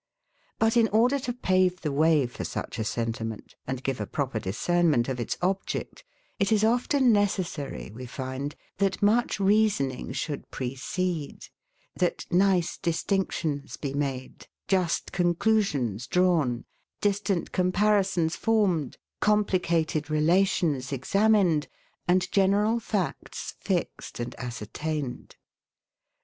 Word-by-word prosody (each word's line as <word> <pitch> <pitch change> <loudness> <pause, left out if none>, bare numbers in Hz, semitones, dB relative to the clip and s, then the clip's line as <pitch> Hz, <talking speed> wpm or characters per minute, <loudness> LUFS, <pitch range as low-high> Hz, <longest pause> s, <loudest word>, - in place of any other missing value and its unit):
But 225 +1 +2
in 230 -1 +5
order 240 +6 +3
to 250 -1 -3
pave 185 -6 +1
the 150 - -1
way 155 0 +4
for 120 - -6
such - - -5
a - - 0
sentiment, 115 -1 -3
and 130 0 -4
give 135 -3 -2
a 105 - -3
proper 135 -6 -2
discernment 140 - +1
of 130 -2 -3
its 120 - -2
object, 195 - -2 0.4
it 200 +1 +1
is 215 -1 +3
often 245 +3 +3
necessary, 185 - -1
we 125 +2 -8
find, 130 +3 -5 0.2
that 195 0 0
much 220 +2 +3
reasoning 195 -12 +2
should 145 +2 -4
precede, 145 +5 -3 0.5
that 180 - -1
nice 185 -1 +2
distinctions 165 -5 -1
be 140 -2 -4
made, 135 -3 -4 0.2
just 185 -3 0
conclusions 175 - +1
drawn, 165 -10 +2 0.3
distant 200 -3 0
comparisons 185 -2 +2
formed, 195 - +1 0.2
complicated 170 -7 +1
relations 155 -3 +2
examined, 190 - +2 0.4
and 180 +1 +2
general 205 +4 +3
facts 205 -5 -3
fixed - - -3
and 120 - -4
ascertained. 125 +4 -5
175 Hz, 115 wpm, -27 LUFS, 135-200 Hz, 0.5 s, in